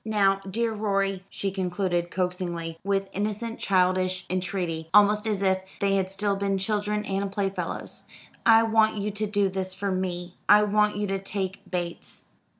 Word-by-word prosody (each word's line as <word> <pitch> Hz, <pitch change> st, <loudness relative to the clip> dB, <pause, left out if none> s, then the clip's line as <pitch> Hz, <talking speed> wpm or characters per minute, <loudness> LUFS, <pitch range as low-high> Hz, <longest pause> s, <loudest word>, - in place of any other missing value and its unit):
Now, 195 Hz, -3 st, +2 dB
dear 230 Hz, +3 st, 0 dB
Rorie," 195 Hz, -2 st, 0 dB
she 195 Hz, 0 st, -3 dB
concluded 180 Hz, -2 st, -1 dB
coaxingly, 175 Hz, -3 st, -3 dB
with 195 Hz, 0 st, 0 dB
innocent 215 Hz, +3 st, -3 dB
childish 185 Hz, -1 st, +1 dB
entreaty, 180 Hz, -3 st, -2 dB
almost 210 Hz, +1 st, +5 dB
as 205 Hz, -2 st, 0 dB
if 190 Hz, -1 st, +3 dB, 0.2 s
they 195 Hz, 0 st, +2 dB
had 190 Hz, -1 st, 0 dB
still 200 Hz, +1 st, -1 dB
been 195 Hz, 0 st, 0 dB
children 210 Hz, +1 st, -1 dB
and 195 Hz, 0 st, -2 dB
playfellows, 195 Hz, -1 st, -3 dB, 0.4 s
"I 225 Hz, 0 st, +7 dB
want 220 Hz, -1 st, +3 dB
you 205 Hz, +1 st, -2 dB
to 210 Hz, +1 st, -2 dB
do 205 Hz, -1 st, +2 dB
this 185 Hz, 0 st, -3 dB
for 200 Hz, +1 st, -2 dB
me 180 Hz, -1 st, -3 dB
I 210 Hz, +1 st, +8 dB
want 210 Hz, 0 st, +2 dB
you 205 Hz, -, 0 dB
to 195 Hz, -1 st, -1 dB
take 195 Hz, 0 st, -3 dB
Bates." 175 Hz, -2 st, -4 dB
195 Hz, 160 wpm, -26 LUFS, 185-210 Hz, 0.4 s, I